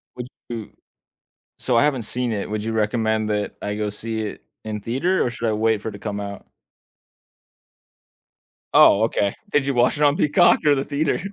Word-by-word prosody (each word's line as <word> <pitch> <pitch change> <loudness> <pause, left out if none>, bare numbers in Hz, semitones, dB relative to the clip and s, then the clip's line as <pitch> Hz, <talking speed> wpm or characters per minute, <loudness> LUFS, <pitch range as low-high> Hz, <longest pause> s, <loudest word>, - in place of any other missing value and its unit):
Would 125 0 -6 0.2
you 115 -3 -6 0.9
so, 125 -2 0
I 140 - +5
haven't 135 -5 +1
seen 120 +2 -2
it, 100 -1 -3
would 105 0 -3
you 115 - -2
recommend 110 0 0
that 105 -1 -2
I 105 0 -3
go 105 -1 -2
see 110 +2 -3
it 105 - -6 0.2
in 105 -1 -4
theater, 135 - 0
or 120 - -1
should 115 0 -3
I - - +1
wait 110 0 +1
for 110 - -5
it - - -5
to 100 - -9
come 105 -2 -4
out? 100 0 -7 2.3
Oh, 110 -8 +6
okay. 100 -3 0
Did 145 -6 +1
you 140 - 0
watch 120 +3 +2
it 150 - +1
on 145 0 +4
Peacock 150 - +4
or 145 -1 +5
the 135 - -2
theater? 150 +2 -1
115 Hz, 195 wpm, -22 LUFS, 105-130 Hz, 2.3 s, Oh